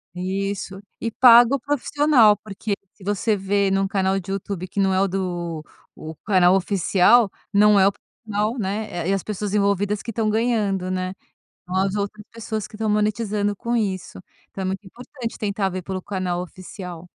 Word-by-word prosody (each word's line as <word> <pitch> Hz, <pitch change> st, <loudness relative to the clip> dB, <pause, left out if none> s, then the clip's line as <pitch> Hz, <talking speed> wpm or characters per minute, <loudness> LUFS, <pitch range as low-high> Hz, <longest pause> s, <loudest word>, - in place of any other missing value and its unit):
Isso, 195 Hz, +1 st, -3 dB, 0.2 s
e 230 Hz, -, -2 dB
paga 240 Hz, +2 st, +7 dB
o -, -, -3 dB
profissional, 285 Hz, -4 st, +3 dB
porque 205 Hz, 0 st, -5 dB, 0.2 s
se 190 Hz, -, -17 dB
você 205 Hz, +1 st, 0 dB
vê 195 Hz, 0 st, +1 dB
num 195 Hz, 0 st, +1 dB
canal 195 Hz, 0 st, 0 dB
de 195 Hz, +1 st, -7 dB
YouTube, 195 Hz, -2 st, -4 dB
que 185 Hz, -, -18 dB
não 195 Hz, -1 st, +3 dB
é 185 Hz, -, +2 dB
o 195 Hz, -, +3 dB
do 175 Hz, -4 st, -3 dB, 0.3 s
o 160 Hz, +1 st, -8 dB
canal 185 Hz, -3 st, +4 dB
oficial, 195 Hz, +3 st, +3 dB, 0.2 s
não 210 Hz, 0 st, +6 dB
é 190 Hz, -, +6 dB
o 200 Hz, -, +1 dB, 0.3 s
canal, 215 Hz, +3 st, -1 dB
né, 210 Hz, +2 st, -2 dB, 0.2 s
é 195 Hz, -, +3 dB
as 195 Hz, -, -1 dB
pessoas 210 Hz, -1 st, -4 dB
envolvidas 200 Hz, 0 st, +1 dB
que 230 Hz, -, -5 dB
estão 220 Hz, 0 st, 0 dB
ganhando, 210 Hz, -5 st, 0 dB
né. 185 Hz, 0 st, -2 dB, 0.5 s
Não 180 Hz, -, -4 dB
as 190 Hz, +1 st, +1 dB
outras 205 Hz, +1 st, -4 dB
pessoas 220 Hz, -2 st, -4 dB
que -, -, -20 dB
estão 220 Hz, 0 st, -2 dB
monetizando 210 Hz, -1 st, 0 dB
com 235 Hz, +4 st, -3 dB
isso, 195 Hz, -5 st, -3 dB, 0.3 s
então 195 Hz, -, -6 dB
é -, -, -3 dB
muito 190 Hz, +1 st, -4 dB
importante 245 Hz, +3 st, -8 dB
tentar 200 Hz, -2 st, -1 dB
ver 185 Hz, 0 st, -5 dB
pelo 185 Hz, +1 st, -4 dB
canal 185 Hz, -3 st, -2 dB
oficial. 180 Hz, -1 st, -9 dB
200 Hz, 180 wpm, -22 LUFS, 190-215 Hz, 0.5 s, paga